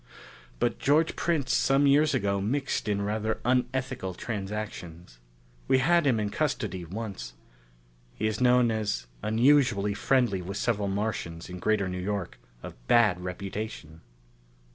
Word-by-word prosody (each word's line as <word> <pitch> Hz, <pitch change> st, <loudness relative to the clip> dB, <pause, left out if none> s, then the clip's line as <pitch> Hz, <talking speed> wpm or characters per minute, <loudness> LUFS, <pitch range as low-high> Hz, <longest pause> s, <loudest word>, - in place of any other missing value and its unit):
But -, -, 0 dB
George 155 Hz, +4 st, +2 dB
Prince 155 Hz, -6 st, 0 dB
some 135 Hz, +1 st, +3 dB
years 145 Hz, +1 st, +4 dB
ago 100 Hz, -4 st, 0 dB
mixed 135 Hz, +4 st, -1 dB
in 100 Hz, -1 st, 0 dB
rather 110 Hz, +2 st, -1 dB
unethical 125 Hz, -5 st, -1 dB
transactions. 95 Hz, -, -6 dB, 0.5 s
We 130 Hz, -, +4 dB
had 170 Hz, +3 st, +3 dB
him 120 Hz, -5 st, +3 dB
in 105 Hz, -1 st, -2 dB
custody 105 Hz, -, -2 dB
once. 100 Hz, -, -6 dB, 0.8 s
He 110 Hz, -, -3 dB
is 110 Hz, +3 st, -1 dB
known 125 Hz, -1 st, +4 dB
as 105 Hz, -, -2 dB, 0.2 s
unusually 115 Hz, -3 st, +3 dB
friendly 120 Hz, -5 st, +1 dB
with 95 Hz, +3 st, -5 dB
several 105 Hz, -4 st, 0 dB
Martians 95 Hz, -5 st, -3 dB
in 90 Hz, -, -7 dB
Greater 105 Hz, -1 st, +1 dB
New 90 Hz, 0 st, -4 dB
York 95 Hz, -10 st, -4 dB, 0.2 s
of -, -, -7 dB
bad 105 Hz, -7 st, +4 dB
reputation." 90 Hz, -3 st, -6 dB
105 Hz, 135 wpm, -28 LUFS, 95-125 Hz, 0.8 s, years